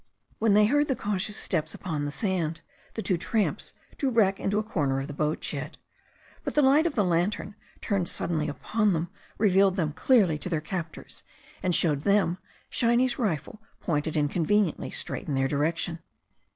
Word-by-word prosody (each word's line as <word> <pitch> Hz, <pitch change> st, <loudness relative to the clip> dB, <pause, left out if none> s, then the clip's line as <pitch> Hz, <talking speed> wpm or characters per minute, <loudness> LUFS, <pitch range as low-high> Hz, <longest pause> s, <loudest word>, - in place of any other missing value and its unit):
When 215 Hz, -2 st, +3 dB
they 210 Hz, 0 st, +6 dB
heard 290 Hz, +6 st, +2 dB
the 265 Hz, -, 0 dB
cautious 205 Hz, -1 st, -2 dB
steps 155 Hz, -3 st, -1 dB
upon 155 Hz, -5 st, -3 dB
the -, -, -2 dB
sand, 165 Hz, -2 st, -2 dB, 0.3 s
the 220 Hz, -, -3 dB
two 180 Hz, -4 st, +1 dB
tramps 215 Hz, +4 st, -1 dB, 0.3 s
drew 275 Hz, -, +1 dB
back 200 Hz, -5 st, +3 dB
into 205 Hz, +1 st, 0 dB
a 215 Hz, -, +1 dB
corner 145 Hz, -11 st, -1 dB
of 135 Hz, -, -3 dB
the 145 Hz, -, -7 dB
boatshed. 150 Hz, +1 st, -3 dB, 0.7 s
But -, -, -4 dB
the 295 Hz, -, +4 dB
light 290 Hz, +5 st, +5 dB
of 290 Hz, -, -5 dB
a 205 Hz, -, +4 dB
lantern 180 Hz, +4 st, 0 dB, 0.3 s
turned 195 Hz, -4 st, -1 dB
suddenly 155 Hz, -3 st, -1 dB
upon 210 Hz, +6 st, 0 dB
them 170 Hz, +2 st, -2 dB, 0.3 s
revealed 195 Hz, -2 st, +4 dB
them 160 Hz, -6 st, -1 dB
clearly 190 Hz, -, +3 dB
to 180 Hz, -, -4 dB
their 165 Hz, -3 st, 0 dB
captors, 165 Hz, 0 st, -6 dB, 0.4 s
and 180 Hz, -2 st, +1 dB
showed 150 Hz, -5 st, +2 dB
them 195 Hz, -1 st, +2 dB, 0.3 s
Shiny's 240 Hz, +2 st, +2 dB
rifle 210 Hz, -, -2 dB, 0.2 s
pointed 155 Hz, -1 st, -1 dB
inconveniently 165 Hz, +5 st, +1 dB
straight -, -, -3 dB
in 145 Hz, -, -1 dB
their 135 Hz, 0 st, +2 dB
direction. 160 Hz, +4 st, -1 dB
185 Hz, 170 wpm, -27 LUFS, 155-210 Hz, 0.7 s, they